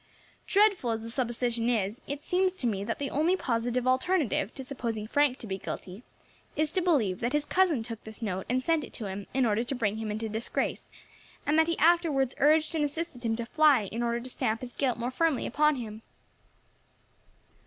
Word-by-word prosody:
Dreadful 400 - +3
as 225 -1 -1
the 230 - -6
supposition 240 -1 -1
is, 215 -1 0
it 285 +1 -5
seems 370 +1 +1
to 270 - -4
me 200 -4 0
that 230 +3 -3
the 280 -1 -3
only 330 +6 +2
positive 245 -3 -1
alternative 260 - +1
to 265 - -5
supposing 235 -5 -4
Frank 280 +2 +2
to 235 - -9
be 195 -2 -4
guilty 185 +3 -6 0.5
is 305 0 +1
to 370 - +1
believe 255 - +2
that 240 +3 -1
his 295 0 +1
cousin 345 -11 +2
took 230 -1 -7
this 220 -1 -10
note 190 -5 -3
and 255 +1 +1
sent 325 0 +2
it - - -10
to 220 - -5
him 195 +1 -5
in 265 -2 +3
order 220 +1 +1
to 260 +3 -3
bring 215 -4 0
him 220 -1 -4
into 215 +2 -2
disgrace, 220 +2 -2 0.6
and 295 - +2
that 320 - +4
he 335 - 0
afterwards 315 -6 +3
urged 310 +3 +4
and 315 -2 +1
assisted 295 -3 -4
him 225 -1 +1
to 235 0 -4
fly 295 -3 +4
in 230 - -3
order 235 0 0
to 250 +2 -8
stamp 220 -1 -1
his 250 -1 -7
guilt 260 -4 0
more 240 +2 -2
firmly 315 0 +1
upon 300 +3 +3
him." 220 -4 -6
250 Hz, 205 wpm, -29 LUFS, 225-300 Hz, 0.6 s, that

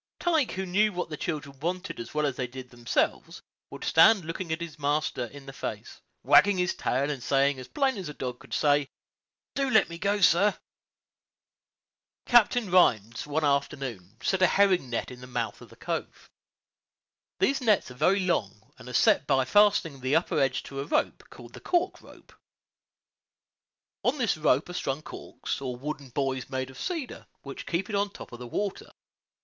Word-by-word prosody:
Tige, 320 -7 +1
who 190 +1 -3
knew 210 +4 +2
what 180 -2 -3
the - - -3
children 140 -4 -5
wanted 180 +5 -3
as 115 - -7
well 150 0 0
as 140 -3 -1
they 125 -1 -3
did 125 0 -10
themselves, 120 -1 -1 0.3
would - - -9
stand 185 +2 +5
looking 165 +2 -5
his 160 -1 -4
master 145 -3 0
in 140 +3 -12
the 135 - -9
face, - - -6 0.2
wagging 205 -1 +6
his 180 -1 +1
tail, 140 +3 -1
and 140 -4 -5
saying, 135 +1 +2
as 130 - -9
plain 275 -3 0
as 185 -5 -5
a - - -6
dog 125 -1 -5
could 135 - -17
say, 145 -2 +2 0.6
"Do 275 -1 0
let 220 -7 +4
me 170 0 -8
go, 200 +2 +1
sir." 195 +3 +4 1.7
Captain 240 -3 +4
Rhines, 115 - +3
one 150 +2 -1
afternoon, 135 -8 -2
set 190 -1 +1
a 185 - +7
herring 190 -9 +3
net 115 - -3
in 125 0 -11
the 125 - -10
mouth 115 -4 -3
of - - -13
the - - -16
cove. - - -5 1.1
These 275 0 +1
nets 210 - +2
are - - -8
very 190 +10 +2
long, 110 - -2
and 125 - -10
are - - -8
set 140 - +4
by 135 -2 +3
fastening 200 -6 +3
the 130 +3 +1
upper 165 - +1
edge 130 -2 +1
to 135 - -7
a 140 - -3
rope, - - -1
called - - -13
the - - -10
cork 360 +1 0
rope. - - -17 1.7
On 260 +4 +1
this 240 -7 +1
rope 155 -2 +2
are 180 - -8
strung 150 -4 -3
corks, - - -6
or 130 -2 -4
wooden 140 +1 -6
buoys 130 -1 -2
made 130 -1 -3
of 130 - -13
cedar, 330 -8 -5 0.2
which 140 -1 -8
keep 175 +3 -1
it 210 - -3
on 200 0 +1
top - - -11
of 120 - -9
the 125 - -7
water. 200 - -4
150 Hz, 190 wpm, -27 LUFS, 130-195 Hz, 1.7 s, a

